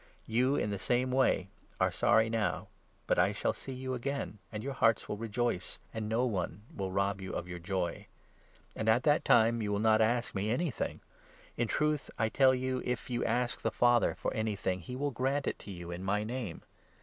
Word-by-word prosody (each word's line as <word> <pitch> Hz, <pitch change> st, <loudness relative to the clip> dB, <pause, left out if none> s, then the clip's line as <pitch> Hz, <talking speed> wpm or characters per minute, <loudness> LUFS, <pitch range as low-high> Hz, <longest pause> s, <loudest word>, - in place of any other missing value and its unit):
You, 125 Hz, +5 st, +2 dB
in 105 Hz, -, 0 dB
the 100 Hz, -, -3 dB
same 125 Hz, +5 st, +1 dB
22 -, -, 0 dB
way, 100 Hz, -7 st, +3 dB, 0.3 s
are -, -, +3 dB
sorry 110 Hz, 0 st, +4 dB
now; 115 Hz, -2 st, -1 dB, 0.4 s
but -, -, +2 dB
I -, -, +4 dB
shall -, -, 0 dB
see 135 Hz, -, -8 dB
you 130 Hz, 0 st, -4 dB
again, 130 Hz, -4 st, -3 dB
and 105 Hz, -1 st, -5 dB
your 140 Hz, -, -3 dB
hearts 115 Hz, -3 st, +3 dB
will -, -, -2 dB
rejoice, 115 Hz, -2 st, -2 dB, 0.2 s
and 110 Hz, -1 st, -3 dB
no 115 Hz, +3 st, +2 dB
one 100 Hz, -4 st, -2 dB
will 95 Hz, -1 st, -3 dB
rob 100 Hz, +1 st, 0 dB
you 95 Hz, -, -5 dB
of 85 Hz, -, -3 dB
your 90 Hz, -1 st, -6 dB
joy. 90 Hz, -1 st, -3 dB, 0.7 s
And 110 Hz, -, -3 dB
23 110 Hz, -, +7 dB
at 125 Hz, -, -2 dB
that 150 Hz, 0 st, +3 dB
time 115 Hz, +1 st, +5 dB
you 105 Hz, -1 st, -1 dB
will 100 Hz, -, +1 dB
not 110 Hz, +1 st, +4 dB
ask 120 Hz, +2 st, +1 dB
me 100 Hz, +2 st, -1 dB
anything; 130 Hz, -, -1 dB, 0.5 s
in 120 Hz, -, 0 dB
truth 150 Hz, +3 st, 0 dB
I 110 Hz, -1 st, +1 dB
tell 130 Hz, +2 st, +5 dB
you, 130 Hz, 0 st, -1 dB
if 125 Hz, +1 st, -3 dB
you 120 Hz, 0 st, 0 dB
ask 120 Hz, +1 st, 0 dB
the -, -, +1 dB
Father 120 Hz, -1 st, +3 dB
for -, -, -2 dB
anything, 100 Hz, -4 st, -1 dB
he 110 Hz, +9 st, -7 dB
will 145 Hz, +2 st, -1 dB
grant 135 Hz, +3 st, 0 dB
it -, -, -2 dB
to 100 Hz, -, -9 dB
you 85 Hz, -2 st, -7 dB
in 85 Hz, +1 st, -5 dB
my 105 Hz, +2 st, +1 dB
Name. 115 Hz, -4 st, -5 dB
115 Hz, 215 wpm, -32 LUFS, 100-125 Hz, 0.7 s, 23